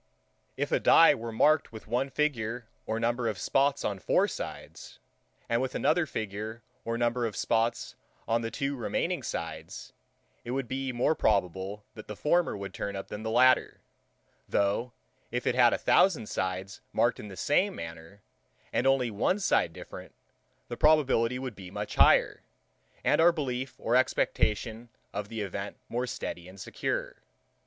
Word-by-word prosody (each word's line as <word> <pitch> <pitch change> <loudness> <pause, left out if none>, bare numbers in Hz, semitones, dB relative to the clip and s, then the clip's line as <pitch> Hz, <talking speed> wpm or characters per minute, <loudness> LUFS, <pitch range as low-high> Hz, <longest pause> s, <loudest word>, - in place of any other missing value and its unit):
If - - -2
a - - +3
dye - - +7
were 115 0 -5
marked 150 +7 +3
with 110 -1 -10
one 125 +5 -1
figure 120 -6 -1 0.2
or 110 +1 -1
number 120 +1 0
of 110 -3 -2
spots 140 +8 +1
on 100 -2 -2
four 85 - +2
sides, - - -8 0.5
and 115 +1 +1
with 130 - -3
another 160 +1 +2
figure 110 0 -5 0.2
or 115 0 -2
number 120 0 +1
of 105 - -7
spots 115 0 0 0.3
on 115 +1 +1
the 115 - -3
two 140 +3 -2
remaining 120 - -1
sides, - - -6 0.5
it - - -9
would 135 -3 -3
be 135 +1 -2
more 125 +5 +2
probable, 100 - 0
that 110 - -11
the 105 - -6
former 165 - +1
would 100 0 -7
turn 100 0 -4
up 95 - -6
than 105 - -6
the 110 - -3
latter; 130 +3 +3 0.7
though, 100 +5 +1 0.4
if 125 0 -3
it - - +2
had 120 -1 +5
a - - +1
thousand 180 - +3
sides 95 +2 -3
marked 120 0 +2
in - - -7
the 95 -2 -10
same 180 - +2
manner, 80 +4 -9 0.5
and - - +2
only 130 -3 +2
one 110 - +1
side 90 - +2
different, - - -10 0.5
the 120 - -6
probability 135 -6 +3
would 130 -3 -5
be 95 -2 -10
much 105 +2 -5
higher, - - +4 0.6
and - - +3
our 170 +1 +7
belief 130 -5 -3
or 120 - 0
expectation 115 -2 0 0.2
of 105 0 -4
the 115 -1 -4
event 100 0 -5
more 125 +2 -2
steady 90 -6 -5
and 95 +2 -13
secure. - - -3
115 Hz, 165 wpm, -29 LUFS, 105-130 Hz, 0.7 s, dye